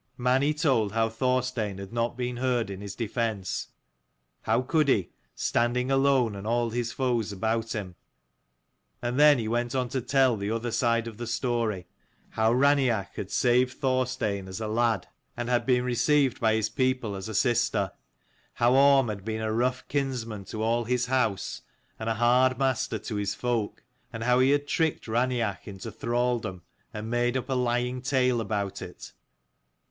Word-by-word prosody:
Mani 130 +4 +2
told 135 - +1
how 115 0 +2
Thorstein 125 -3 -1
had 100 +3 -8
not 120 0 -1
been 125 -1 -3
heard 120 -4 0
in 95 0 -7
his 100 -1 -7
defence, 110 -4 -2 0.7
how 115 +3 +1
could 150 +3 +2
he, 100 -10 +2 0.2
standing 125 +2 0
alone 135 -5 +3
and 100 +2 -7
all 120 0 +1
his 120 0 -2
foes 120 -5 -1
about 110 +3 -1
him? 100 -5 -5 1.1
And 120 +3 -1
then 150 -1 +7
he 115 -2 -2
went 120 +2 -1
on 125 -2 0
to 130 +1 -2
tell 130 -1 +3
the 100 0 -3
other 115 +1 -2
side 115 -1 +1
of 110 -2 -8
the 120 0 -5
story; 115 -5 -1 0.4
how 110 0 +1
Raineach 130 -6 +2
had 95 - -5
saved 125 +2 +2
Thorstein 130 -7 -1
as 95 +2 -6
a 110 - -3
lad, 110 -3 +1 0.3
and 120 - -2
237 - - -5
had 120 - +2
been 125 -1 +3
received 130 +2 +2
by 110 -1 +3
his 110 -1 +1
people 130 -2 -1
as 95 +2 -6
a 110 - -5
sister: 110 -5 +1 0.6
how 120 +1 +3
Orm 135 -1 +5
had 100 -3 -5
been 110 +1 -3
a 110 0 -1
rough 125 +2 0
kinsman 125 -7 -3
to 110 +2 -4
all 115 +1 +1
his 125 +1 0
house, 125 -6 -1 0.4
and 110 0 -2
a 115 - 0
hard 125 +2 +3
master 135 -2 0
to 110 - -5
his 100 0 -2
folk: 120 -4 -2 0.3
and 115 -1 -5
how 125 +1 +3
he 130 +1 +4
had 145 0 +2
tricked 160 0 0
Raineach 115 -4 -1
into 95 -2 -7
thralldom, 120 -6 -1 0.3
and 105 +1 -6
made 120 +2 +1
up 130 - -5
a - - +1
lying 125 0 0
tale 125 -2 +1
about 100 -3 -3
it. - - -9
120 Hz, 175 wpm, -27 LUFS, 110-130 Hz, 1.1 s, then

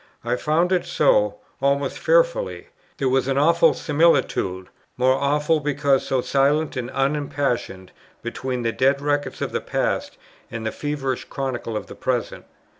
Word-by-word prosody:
I 120 +1 +1
found 160 +7 +1
it 180 -2 +2
so, 105 -8 +2 0.2
almost 140 0 0
fearfully; - - +1 0.3
there 135 - 0
was 130 0 +1
an 135 0 0
awful 165 +4 +4
similitude, 145 - +1 0.3
more 130 +1 +4
awful, 150 +3 +1
because 145 -2 +1
so 130 -1 +1
silent 145 +4 +1
and 125 -1 -3
unimpassioned, 135 -9 -2 0.3
between 125 +1 -3
the 115 - +1
dead 135 +3 +2
records 145 0 -1
of - - -3
the - - -2
past - - -2 0.3
and 115 -1 -6
the 110 - -1
feverish 140 -3 -3
chronicle 125 -5 -4
of - - -5
the - - -10
present. 125 -2 -3
135 Hz, 150 wpm, -22 LUFS, 125-150 Hz, 0.3 s, awful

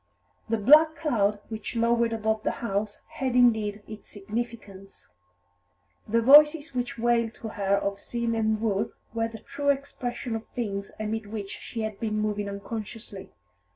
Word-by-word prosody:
The 225 - +1
black 305 +9 +6
cloud 210 -11 0
which 220 +1 -6
lowered 235 0 +2
above 220 -1 0
the - - 0 0.2
house 205 0 -2
had 260 -2 -3
indeed 220 -4 +3
its 215 -1 -10
significance; 205 - -7 1.0
the 230 +2 +2
voices 295 +3 +7
which 245 -1 -3
wailed 235 -1 +1
to 225 - -7
her 200 -2 +1
of 200 0 -2
sin 235 +1 -2
and 220 -1 +1
woe 215 -1 -1 0.2
were 225 0 0
the 225 0 -9
true 285 +6 -3
expression 250 -4 -2
of 225 - -6
things 200 -4 -3
amid 215 0 -3
which 205 -2 -6
she 230 - -6
had 215 -2 -4
been 215 -1 -2
moving 210 -1 -1
unconsciously. 200 -1 -7
225 Hz, 155 wpm, -27 LUFS, 205-235 Hz, 1.0 s, voices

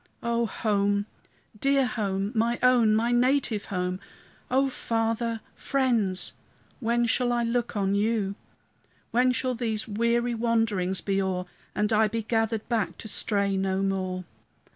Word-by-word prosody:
O 235 0 +1
home! 205 -2 +1 0.5
dear 275 +1 +3
home! 200 -4 -1
my 235 +1 +1
own, 240 -4 +5
my 230 +2 +2
native 245 -3 +2
home! 180 -1 -2 0.5
O 270 +2 +3
Father, 230 -2 -1
friends! 230 -9 0 0.5
when 235 -1 +1
shall 245 +1 +2
I 240 0 +1
look 235 -1 -1
on 195 -1 +1
you? 205 -1 +1 0.8
When 250 +2 +4
shall 255 0 0
these 225 -3 -2
weary 235 +3 +1
wanderings 225 -5 0
be 195 -1 0
o'er, 185 -1 -1 0.3
And 210 +2 +1
I 215 0 +4
be 225 +1 -3
gathered 225 0 0
back 230 -4 -1
to - - -8
stray 200 -2 0
no 190 0 0
more? 185 -1 -1
225 Hz, 140 wpm, -27 LUFS, 200-235 Hz, 0.8 s, own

